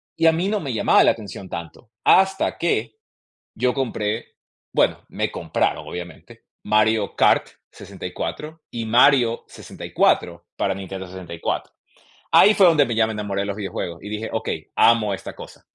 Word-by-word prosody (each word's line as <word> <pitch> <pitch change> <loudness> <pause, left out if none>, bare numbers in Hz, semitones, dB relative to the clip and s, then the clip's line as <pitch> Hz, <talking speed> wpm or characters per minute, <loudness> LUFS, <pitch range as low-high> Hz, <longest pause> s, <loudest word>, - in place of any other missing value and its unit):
y 165 - 0
a - - +7
mí 170 +4 -1
no 210 0 0
me 140 -7 -4
llamaba 110 - +4
la - - +5
atención 100 -3 -8
tanto, 85 +7 -8
hasta 190 0 +3
que 115 -10 -1 0.6
yo 125 +2 0
compré, 115 -4 -2 0.5
bueno, - - +1
me - - -2
compraron, - - -2
obviamente, 90 -2 -9 0.2
Mario 110 0 +2
Kart - - +3 0.2
64, 155 +2 -7
y 115 -1 -4
Mario 120 0 +4
64 85 0 -1
para 95 - 0
Nintendo 95 0 -7
64. 90 -2 -5 0.6
Ahí 210 - +7
fue 195 -3 +6
donde 155 -4 +5
me 120 - -3
ya 110 0 +3
me 110 - -4
enamoré 100 -2 -3
de - - -2
los 100 -1 -3
videojuegos 95 -4 -5
y 105 - -7
dije: 105 +1 -4
"Okey, 110 0 -3
amo 115 -3 +4
esta 95 - -7
cosa". - - -13
110 Hz, 160 wpm, -22 LUFS, 100-130 Hz, 0.6 s, a